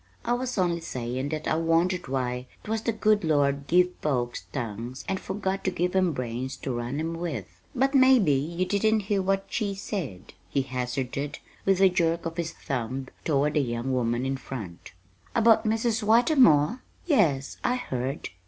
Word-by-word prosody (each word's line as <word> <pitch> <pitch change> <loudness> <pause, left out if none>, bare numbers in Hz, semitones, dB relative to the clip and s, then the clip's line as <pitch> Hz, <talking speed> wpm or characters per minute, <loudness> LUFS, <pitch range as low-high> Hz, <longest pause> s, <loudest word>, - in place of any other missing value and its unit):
I 240 - +2
was 250 0 -2
only 175 -2 +1
sayin' 130 -1 -3
that 155 0 -3
I - - +2
wondered 165 +2 +1
why 125 -1 -2 0.2
'twas 220 +1 -2
the 230 - 0
good 215 -2 +2
Lord 140 -3 +1
give 180 +1 +4
folks 120 -5 -1
tongues 120 0 -5
and 190 - -1
forgot 195 0 -3
to - - +3
give 180 0 -1
'em 185 -2 +3
brains 125 0 -4
to 130 -3 -2
run 120 +4 -3
'em 165 +1 -2
with. 165 - -4 0.3
But 270 +2 +2
maybe 260 - +6
you 165 +7 0
didn't 215 +3 +2
hear 200 0 0
what 195 +1 0
she 205 -3 -2
said," 165 - -5 0.2
he 135 - +1
hazarded, 130 +2 -3 0.3
with 195 -1 +3
a 190 - +7
jerk 170 -2 0
of 165 +1 -4
his 165 -1 -2
thumb 130 -2 -4
toward 150 -1 +1
the 150 - +3
young 120 0 -2
woman 120 0 0
in 135 0 -1
front. 105 -13 -8 0.4
"About 230 0 +5
Mrs. 225 +2 +1
Whitermore? 230 - +4 0.2
Yes, 165 - +2
I 250 - +2
heard." 135 - -3
165 Hz, 170 wpm, -27 LUFS, 130-200 Hz, 0.4 s, a